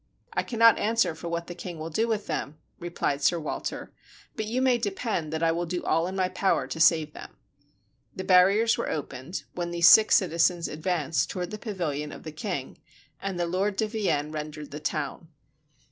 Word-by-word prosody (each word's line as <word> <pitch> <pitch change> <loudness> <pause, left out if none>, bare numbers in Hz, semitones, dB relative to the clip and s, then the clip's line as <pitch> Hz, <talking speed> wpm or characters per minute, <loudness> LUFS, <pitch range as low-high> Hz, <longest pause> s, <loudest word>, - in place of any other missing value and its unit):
"I - - +1
cannot 230 -1 +4
answer 225 -4 +2
for 165 +2 -8
what 170 0 -3
the 175 - -7
king 175 -1 -7
will 160 +1 -6
do 225 +8 +1
with 220 -2 -1
them," 150 +2 -4 0.2
replied 170 -4 -2
Sir 170 +4 +3
Walter, 155 - -5 0.4
"but 215 -1 -3
you 240 +4 -1
may 255 -2 +3
depend 200 -6 -2
that 160 +1 -2
I 165 - +4
will 170 +1 -2
do 175 +1 -3
all 165 +2 +1
in 190 - -5
my 185 -1 +1
power 185 +1 0
to - - -6
save 160 -2 +4
them." - - -11 0.8
The 190 - -4
barriers 195 +5 +4
were - - -2
opened, 140 +3 -5
when 175 -1 -3
these 170 0 +4
six 215 +3 +8
citizens 170 -1 +2
advanced 160 -1 -1
toward 180 -2 -4
the 215 - -6
pavilion 155 -9 -3
of - - -10
the 155 - -7
king, 155 -3 -5 0.4
and 195 -2 -3
the 175 - +1
Lord 190 +4 -1
de 220 +2 0
Vienne 195 -9 -1
rendered 150 -1 -6
the 150 - -6
town. 150 +1 -3
175 Hz, 195 wpm, -27 LUFS, 155-200 Hz, 0.8 s, six